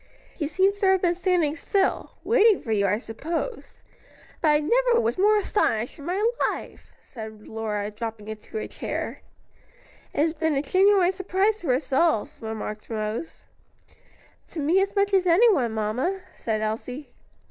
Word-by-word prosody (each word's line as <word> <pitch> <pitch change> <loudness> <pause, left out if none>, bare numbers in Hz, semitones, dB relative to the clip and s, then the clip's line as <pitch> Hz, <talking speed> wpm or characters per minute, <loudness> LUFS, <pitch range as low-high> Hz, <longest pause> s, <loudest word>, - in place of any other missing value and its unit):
"He 300 - -3
seems 385 +6 +1
to 400 - +2
have 380 -1 +3
been 350 -1 +3
standing 350 -4 +1
still 385 +3 0
(waiting 450 -3 +4
for 225 - -6
you, 200 -2 +2
I 205 +2 +2
suppose); 320 - -5 0.6
but 320 - +2
I 300 -1 +5
never 475 +9 +3
was 460 -4 -1
more 420 +2 +5
astonished 245 - 0
in 285 - -9
my 390 +5 +1 0.2
life!" - - -8
said 220 -4 -10
Lora, 215 -2 -3
dropping 215 -1 -6
into 220 - -7
a - - -3
chair. - - -5 0.9
"It - - -1
has 315 +1 +2
been 320 -1 0
a 275 - 0
genuine 375 +3 +4
surprise 385 +3 0
to 330 -9 -1
us 270 +1 -4
all," 275 -6 +3
remarked 220 -1 -6
Rose. 220 +6 -4 1.0
"To 330 - -7
me 325 +6 +3
as 395 +1 -1
much 400 0 +2
as 375 -1 +3
anyone, 345 - +4
mamma," 230 - -1
said 220 -2 -2
Elsie. 245 +6 -4
320 Hz, 160 wpm, -25 LUFS, -, 1.0 s, I